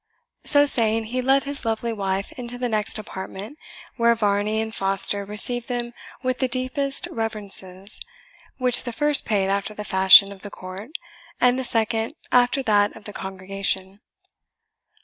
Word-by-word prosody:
So 290 Hz, 0 st, +5 dB
saying 225 Hz, -4 st, +2 dB
he 255 Hz, -, 0 dB
led 270 Hz, +2 st, +3 dB
his 280 Hz, 0 st, -5 dB
lovely 225 Hz, 0 st, -2 dB
wife 195 Hz, -2 st, -2 dB
into 245 Hz, -1 st, -6 dB
the 245 Hz, 0 st, -2 dB
next 220 Hz, -1 st, -1 dB
apartment, 205 Hz, +5 st, -8 dB, 0.4 s
where 235 Hz, -1 st, +4 dB
Varney 210 Hz, 0 st, 0 dB
and 220 Hz, 0 st, -3 dB
Foster 195 Hz, +1 st, -1 dB
received 230 Hz, +4 st, -2 dB
them 240 Hz, -1 st, -3 dB, 0.3 s
with 255 Hz, 0 st, -1 dB
the 260 Hz, -, +1 dB
deepest 255 Hz, +2 st, 0 dB
reverences, 200 Hz, -3 st, -2 dB, 0.6 s
which 250 Hz, -2 st, +4 dB
the 240 Hz, -, -6 dB
first 295 Hz, +2 st, +3 dB
paid 195 Hz, -3 st, +1 dB
after 200 Hz, +2 st, -1 dB
the 210 Hz, -, -6 dB
fashion 190 Hz, 0 st, +7 dB
of 195 Hz, -1 st, -11 dB
the 205 Hz, -, -7 dB
court, 185 Hz, +4 st, -9 dB, 0.5 s
and 250 Hz, +1 st, +3 dB
the -, -, -2 dB
second 225 Hz, +1 st, 0 dB, 0.2 s
after 250 Hz, +2 st, +3 dB
that 205 Hz, -3 st, +2 dB
of 220 Hz, -, -13 dB
the 205 Hz, -, -9 dB
congregation. 190 Hz, +1 st, -3 dB
220 Hz, 155 wpm, -23 LUFS, 200-245 Hz, 0.6 s, fashion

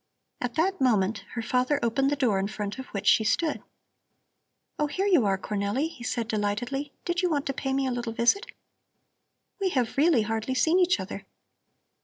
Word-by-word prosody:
At 245 Hz, -1 st, -3 dB
that 365 Hz, +2 st, +1 dB
moment 215 Hz, -5 st, +2 dB, 0.2 s
her 230 Hz, -, -2 dB
father 255 Hz, +5 st, +1 dB
opened 270 Hz, +4 st, +2 dB
the 290 Hz, -, +1 dB
door 240 Hz, -8 st, +1 dB
in 195 Hz, -, 0 dB
front 210 Hz, +2 st, -5 dB
of 260 Hz, -, -7 dB
which 200 Hz, 0 st, -5 dB
she 205 Hz, +3 st, +5 dB
stood. 310 Hz, +8 st, 0 dB, 1.2 s
"Oh, 300 Hz, -, +2 dB
here 375 Hz, +7 st, -2 dB
you 340 Hz, -, +4 dB
are, 195 Hz, -1 st, +2 dB
Cornelli," 205 Hz, +9 st, -1 dB
he 240 Hz, -, -11 dB
said 235 Hz, -2 st, -2 dB
delightedly. 240 Hz, +7 st, -2 dB
"Did 350 Hz, +1 st, 0 dB
you 360 Hz, -, +1 dB
want 290 Hz, -3 st, 0 dB
to 275 Hz, -, -1 dB
pay 270 Hz, 0 st, -3 dB
me 270 Hz, 0 st, +1 dB
a 260 Hz, -, 0 dB
little 240 Hz, -1 st, -3 dB
visit? 240 Hz, -, +2 dB, 1.1 s
We 390 Hz, -1 st, +1 dB
have 255 Hz, -6 st, -1 dB
really 290 Hz, -6 st, +4 dB
hardly 225 Hz, +4 st, -2 dB
seen 330 Hz, +7 st, +3 dB
each 360 Hz, -, +3 dB
other. 195 Hz, +1 st, -7 dB
250 Hz, 190 wpm, -27 LUFS, 215-290 Hz, 1.2 s, she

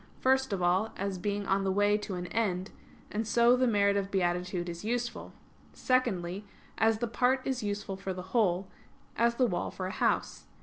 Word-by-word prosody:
First 265 Hz, -1 st, +2 dB
of 190 Hz, -3 st, -1 dB
all, 185 Hz, +5 st, +2 dB
as 195 Hz, -1 st, -3 dB
being 205 Hz, +2 st, -2 dB
on 195 Hz, 0 st, +1 dB
the 190 Hz, -, +1 dB
way 205 Hz, +2 st, +3 dB
to 210 Hz, -2 st, -3 dB
an 180 Hz, 0 st, -4 dB
end; 190 Hz, -2 st, -1 dB, 0.4 s
and 215 Hz, +1 st, -2 dB
so 235 Hz, +2 st, +5 dB
the 255 Hz, 0 st, +2 dB
merit 200 Hz, -3 st, +3 dB
of 200 Hz, -1 st, -1 dB
beatitude 180 Hz, -1 st, -1 dB
is 170 Hz, +1 st, -6 dB
useful. 235 Hz, +1 st, -3 dB, 0.4 s
Secondly, 200 Hz, -7 st, 0 dB, 0.4 s
as 225 Hz, 0 st, +3 dB
the 240 Hz, +2 st, -2 dB
part 255 Hz, +3 st, +1 dB
is 260 Hz, -2 st, -1 dB
useful 205 Hz, -1 st, -3 dB
for 195 Hz, 0 st, -4 dB
the 180 Hz, -1 st, -5 dB
whole; 190 Hz, -5 st, +2 dB, 0.5 s
as 235 Hz, +1 st, +2 dB
the 255 Hz, -, +3 dB
wall 180 Hz, -7 st, -1 dB
for 185 Hz, -, -5 dB
a 185 Hz, -, -3 dB
house. -, -, -1 dB
205 Hz, 190 wpm, -30 LUFS, 185-235 Hz, 0.5 s, so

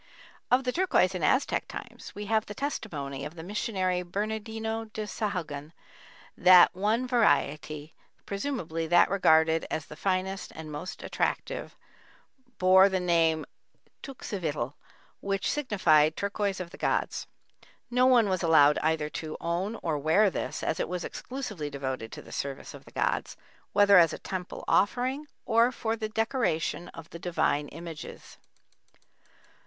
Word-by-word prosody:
Of 255 Hz, +2 st, +4 dB
the 250 Hz, -, 0 dB
turquoise 335 Hz, -, +2 dB
in 180 Hz, -, -4 dB
Aztec 260 Hz, -, +1 dB
times -, -, -9 dB
we 205 Hz, -, -5 dB
have 220 Hz, +1 st, +1 dB
the 210 Hz, -, -7 dB
testimony 145 Hz, -, -4 dB
of 150 Hz, -, -7 dB
the 160 Hz, -, -8 dB
missionary 185 Hz, -2 st, -1 dB
Bernardino 220 Hz, +4 st, -3 dB
de 215 Hz, 0 st, -6 dB
Sahagun 170 Hz, -8 st, -4 dB, 0.6 s
that 180 Hz, -1 st, +7 dB
one 215 Hz, +6 st, 0 dB
variety, 155 Hz, -, +1 dB, 0.3 s
presumably 195 Hz, -, -3 dB
that 175 Hz, +2 st, +5 dB
regarded 160 Hz, -4 st, +4 dB
as 155 Hz, -, -3 dB
the 150 Hz, -, -11 dB
finest 190 Hz, +2 st, -2 dB
and 155 Hz, -1 st, -8 dB
most 160 Hz, +5 st, -6 dB
attractive, -, -, -2 dB, 0.8 s
bore 190 Hz, +1 st, +6 dB
the 190 Hz, -1 st, 0 dB
name 165 Hz, -3 st, +2 dB, 0.6 s
teuxivitl, 160 Hz, -, -4 dB, 0.5 s
which 195 Hz, -1 st, -1 dB
signified 170 Hz, -, +3 dB
"turquoise 200 Hz, -1 st, -1 dB
of 175 Hz, -2 st, -6 dB
the -, -, -12 dB
gods." -, -, -1 dB, 0.6 s
No 250 Hz, +1 st, +4 dB
one 245 Hz, -4 st, +5 dB
was 185 Hz, -2 st, 0 dB
allowed 150 Hz, -4 st, +5 dB
either 160 Hz, -1 st, 0 dB
to 155 Hz, 0 st, -6 dB
own 175 Hz, +6 st, -2 dB
or 155 Hz, -3 st, 0 dB
wear 175 Hz, +8 st, +4 dB
this -, -, -4 dB
as -, -, -1 dB
it -, -, -1 dB
was 180 Hz, -1 st, -3 dB
exclusively 215 Hz, -, -5 dB
devoted 130 Hz, -5 st, -4 dB
to -, -, -8 dB
the -, -, -14 dB
service 140 Hz, -1 st, -5 dB
of -, -, -12 dB
the -, -, -15 dB
gods, -, -, -1 dB, 0.3 s
whether 200 Hz, -2 st, +7 dB
as 165 Hz, -2 st, +4 dB
a -, -, -4 dB
temple 185 Hz, -1 st, -6 dB
offering, 255 Hz, +8 st, +1 dB, 0.2 s
or 230 Hz, +2 st, +4 dB
for 225 Hz, -2 st, -2 dB
the 215 Hz, -1 st, -4 dB
decoration 220 Hz, -, -1 dB
of 165 Hz, -1 st, -11 dB
the 170 Hz, -, -8 dB
divine 155 Hz, -4 st, 0 dB
images. 165 Hz, 0 st, -9 dB
185 Hz, 145 wpm, -28 LUFS, 160-220 Hz, 0.8 s, that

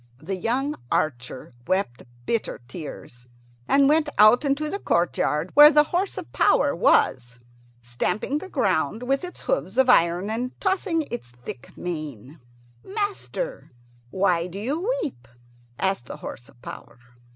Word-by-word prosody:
The 165 Hz, +8 st, -5 dB
young 255 Hz, +10 st, -1 dB, 0.2 s
archer 125 Hz, -3 st, -2 dB
wept 185 Hz, -11 st, -1 dB, 0.2 s
bitter 230 Hz, -2 st, -2 dB
tears, 125 Hz, -6 st, -9 dB, 0.4 s
and 275 Hz, 0 st, +5 dB
went 300 Hz, +1 st, +3 dB
out 215 Hz, +6 st, +7 dB
into 285 Hz, +2 st, 0 dB
the 400 Hz, +6 st, -3 dB
courtyard, 170 Hz, -, 0 dB
where 295 Hz, +1 st, +10 dB
the 300 Hz, -1 st, +6 dB
horse 375 Hz, +3 st, 0 dB
of -, -, -8 dB
power -, -, +3 dB
was, 125 Hz, -1 st, +2 dB, 0.5 s
stamping 180 Hz, -, -2 dB
the 380 Hz, -, -9 dB
ground 195 Hz, -, 0 dB
with 270 Hz, +4 st, 0 dB
its 360 Hz, -, -8 dB
hoofs -, -, -2 dB
of 260 Hz, -1 st, +6 dB
iron 175 Hz, 0 st, +3 dB
and 245 Hz, +3 st, -4 dB
tossing 375 Hz, -4 st, 0 dB
its 240 Hz, -, -6 dB
thick 120 Hz, +1 st, -11 dB
mane. 155 Hz, -5 st, -6 dB, 0.4 s
"Master, 425 Hz, -, -4 dB, 0.4 s
why 180 Hz, 0 st, +1 dB
do 180 Hz, +2 st, -9 dB
you 300 Hz, -, -1 dB
weep?" 125 Hz, -, -6 dB, 0.5 s
asked 190 Hz, -10 st, -1 dB
the -, -, -7 dB
horse 120 Hz, -, -9 dB
of -, -, -22 dB
power. -, -, -10 dB
210 Hz, 140 wpm, -24 LUFS, -, 0.5 s, where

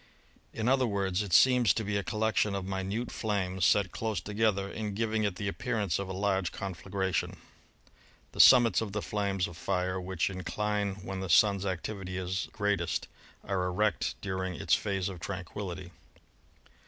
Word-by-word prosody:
In 110 Hz, -, -3 dB
other 130 Hz, -1 st, +3 dB
words, 100 Hz, -2 st, 0 dB
it 100 Hz, -3 st, -5 dB
seems 125 Hz, 0 st, +5 dB
to 110 Hz, -, -1 dB
be 100 Hz, 0 st, -2 dB
a 100 Hz, -, +1 dB
collection 110 Hz, -1 st, 0 dB
of 95 Hz, -1 st, -3 dB
minute 95 Hz, +5 st, -3 dB
flames 95 Hz, -4 st, -1 dB
set 100 Hz, -4 st, +3 dB
close 110 Hz, -2 st, -2 dB
together 105 Hz, -2 st, 0 dB
and 105 Hz, 0 st, -4 dB
giving 110 Hz, 0 st, 0 dB
it 100 Hz, -3 st, -1 dB
the 100 Hz, +1 st, -4 dB
appearance 100 Hz, -2 st, -1 dB
of 100 Hz, -1 st, -4 dB
a -, -, -3 dB
large 95 Hz, -1 st, 0 dB
conflagration. 95 Hz, -1 st, -3 dB, 0.9 s
The -, -, -11 dB
summits 120 Hz, -6 st, +7 dB
of 105 Hz, -3 st, -4 dB
the 105 Hz, -, -2 dB
flames 100 Hz, -3 st, -1 dB
of 85 Hz, -, -11 dB
fire, 90 Hz, 0 st, -1 dB
which 90 Hz, -1 st, -1 dB
incline 100 Hz, +2 st, -2 dB
when 95 Hz, -1 st, -4 dB
the 95 Hz, -1 st, -4 dB
Sun's 100 Hz, +2 st, +4 dB
activity 95 Hz, 0 st, -4 dB
is 95 Hz, 0 st, -2 dB
greatest, 105 Hz, -1 st, -1 dB, 0.4 s
are 95 Hz, -2 st, -1 dB
erect 95 Hz, 0 st, 0 dB
during 95 Hz, -2 st, -3 dB
its -, -, 0 dB
phase 95 Hz, -2 st, +1 dB
of 95 Hz, -3 st, -6 dB
tranquillity. 90 Hz, 0 st, -6 dB
100 Hz, 165 wpm, -30 LUFS, 95-105 Hz, 0.9 s, summits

